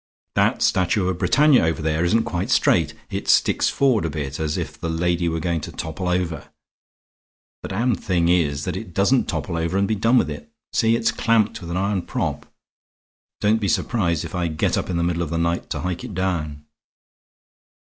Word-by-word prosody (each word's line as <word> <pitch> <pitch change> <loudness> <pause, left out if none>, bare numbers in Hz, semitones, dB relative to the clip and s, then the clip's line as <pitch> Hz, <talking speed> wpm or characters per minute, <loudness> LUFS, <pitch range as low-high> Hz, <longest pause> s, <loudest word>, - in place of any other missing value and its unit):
That - - +2
statue 90 +1 +2
of 90 -1 -3
Britannia 150 - +4
over 80 0 0
there 80 +1 0
isn't 110 +6 +2
quite 90 +1 -3
straight; - - +2 0.2
it - - -4
sticks - - +3
forward 130 -8 +2
a 80 - -1
bit 70 -3 -5
as 75 -1 -1
if - - -4
the 85 - -2
lady 85 +1 0
were 80 0 -2
going 85 -1 -1
to - - -7
topple 90 +3 -4
over. 90 -3 -2 1.1
The - - -7
damned 110 +2 0
thing 85 -3 +1
is 75 -5 +1
that - - -3
it 95 -3 -7
doesn't 120 +7 +3
topple 85 -3 -3
over 85 +3 -1
and 100 0 +2
be 110 - 0
done 115 +4 +3
with - - +2
it. 230 -1 -9 0.2
See, 115 0 +3
it's 115 0 +1
clamped 110 -3 +1
with 85 - -8
an 85 - -2
iron 100 0 0
prop. - - -4 0.9
Don't 110 +2 +2
be 100 - 0
surprised 85 -8 0
if - - -9
I 90 -2 -1
get 80 -1 0
up - - -2
in 90 - -1
the 85 - 0
middle 85 0 0
of 85 - -2
the 85 - -2
night 85 +1 -1
to - - -3
hike 90 +2 -3
it 115 -7 -7
down." 75 -6 -2
90 Hz, 205 wpm, -22 LUFS, 80-105 Hz, 1.1 s, Britannia